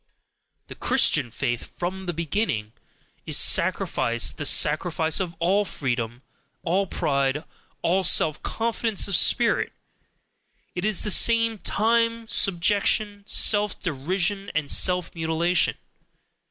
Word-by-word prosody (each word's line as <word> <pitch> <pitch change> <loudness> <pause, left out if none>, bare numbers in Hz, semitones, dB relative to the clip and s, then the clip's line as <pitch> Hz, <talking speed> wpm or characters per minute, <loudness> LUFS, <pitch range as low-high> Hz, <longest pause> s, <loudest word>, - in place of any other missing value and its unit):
The - - -10
Christian 120 - +1
faith 120 +1 -5
from 185 +2 -5
the - - 0
beginning, 160 - -3 0.5
is - - +2
sacrifice 120 0 +2
the 145 - -6
sacrifice 160 +1 +2
of 175 -3 -4
all 190 +5 +1
freedom, 120 - -4 0.4
all 190 +3 0
pride, 140 -2 -1 0.4
all 190 +3 +1
self 155 -3 +2
confidence 225 -2 -1
of 200 - +1
spirit, - - +2 1.0
it 180 +2 -4
is 215 -4 0
at - - -8
the 210 - 0
same 230 +1 +2
time 230 +2 0
subjection, 205 +2 +1
self 210 -1 +2
derision, 185 +6 -2
and 155 -2 -1
self 180 -2 +2
mutilation. 165 +2 0
180 Hz, 115 wpm, -24 LUFS, 155-205 Hz, 1.0 s, is